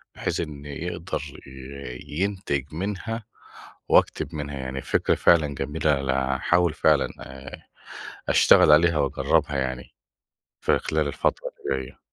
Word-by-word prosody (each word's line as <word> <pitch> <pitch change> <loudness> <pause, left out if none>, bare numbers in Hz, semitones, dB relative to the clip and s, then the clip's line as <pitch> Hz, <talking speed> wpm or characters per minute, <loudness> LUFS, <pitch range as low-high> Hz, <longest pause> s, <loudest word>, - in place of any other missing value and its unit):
بحيث - - -2
إن 75 -2 -5
يقدَر 85 +4 -4 0.3
ي 65 -1 -8 0.2
ينتِج 90 -9 -2
منها، 105 +6 -4 0.6
وأكتب 80 - +2
منها 75 -1 -5
يعني 65 0 -4
فكرة - - +1
فعلًا 80 -3 +4
جميلة، 75 0 0
أنا 65 0 0
هاحاول 90 +4 +2
فعلًا - - +3
آآ، 65 +1 -10 0.7
أشتغل - - +6
عليها 85 +2 +5
وأجرّبها 70 0 +1
يعني، 65 -1 -4 0.7
في - - +2
خلال 80 -1 -1
الفترة - - -1 0.2
اللي 65 -1 -1
جايّة. 65 - -13
70 Hz, 125 wpm, -25 LUFS, 65-85 Hz, 0.7 s, أشتغل